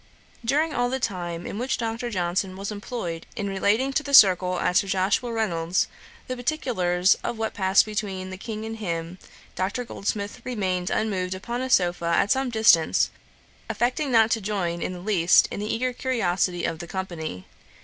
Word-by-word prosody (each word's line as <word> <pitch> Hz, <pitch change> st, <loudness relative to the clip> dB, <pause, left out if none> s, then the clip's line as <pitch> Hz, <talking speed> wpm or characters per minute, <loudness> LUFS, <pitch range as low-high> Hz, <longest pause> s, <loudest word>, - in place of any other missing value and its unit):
During 300 Hz, +6 st, +1 dB
all 245 Hz, 0 st, +1 dB
the 265 Hz, +1 st, -2 dB
time 175 Hz, -6 st, -3 dB
in 205 Hz, -, -5 dB
which 255 Hz, +2 st, -1 dB
Dr. 230 Hz, +1 st, -3 dB
Johnson 185 Hz, -1 st, -1 dB
was 195 Hz, +2 st, -4 dB
employed 205 Hz, -5 st, -5 dB
in 205 Hz, -4 st, -3 dB
relating 210 Hz, +7 st, +1 dB
to 305 Hz, -, +2 dB
the 280 Hz, -1 st, +2 dB
circle 185 Hz, -4 st, +6 dB
at 180 Hz, -, +2 dB
Sir 200 Hz, -, +2 dB
Joshua 195 Hz, +5 st, +1 dB
Reynolds's 180 Hz, -6 st, 0 dB, 0.4 s
the 255 Hz, -, -4 dB
particulars 210 Hz, -, +1 dB
of 235 Hz, -, -3 dB
what 220 Hz, 0 st, -2 dB
passed 190 Hz, 0 st, +4 dB
between 200 Hz, -3 st, -4 dB
the 190 Hz, -, -6 dB
King 220 Hz, +1 st, -5 dB
and 225 Hz, 0 st, -5 dB
him, 170 Hz, -3 st, -4 dB, 0.3 s
Dr. 200 Hz, +7 st, -2 dB
Goldsmith 205 Hz, -2 st, -4 dB
remained 185 Hz, -7 st, -2 dB
unmoved 185 Hz, -4 st, -1 dB
upon 235 Hz, +6 st, -4 dB
a 260 Hz, -, -3 dB
sopha 175 Hz, -5 st, +2 dB
at 200 Hz, -, +2 dB
some 265 Hz, -1 st, +2 dB
distance, 220 Hz, -8 st, +4 dB, 0.6 s
affecting 245 Hz, +6 st, 0 dB
not 225 Hz, -1 st, +5 dB
to 225 Hz, -, +1 dB
join 185 Hz, -4 st, -2 dB
in -, -, -2 dB
the 180 Hz, -, -8 dB
least 180 Hz, -3 st, +4 dB
in -, -, -4 dB
the 210 Hz, +1 st, -2 dB
eager 250 Hz, +2 st, -1 dB
curiosity 185 Hz, -9 st, 0 dB
of 165 Hz, -, -3 dB
the 170 Hz, -, -7 dB
company. 165 Hz, -, -5 dB
200 Hz, 180 wpm, -25 LUFS, 180-235 Hz, 0.6 s, circle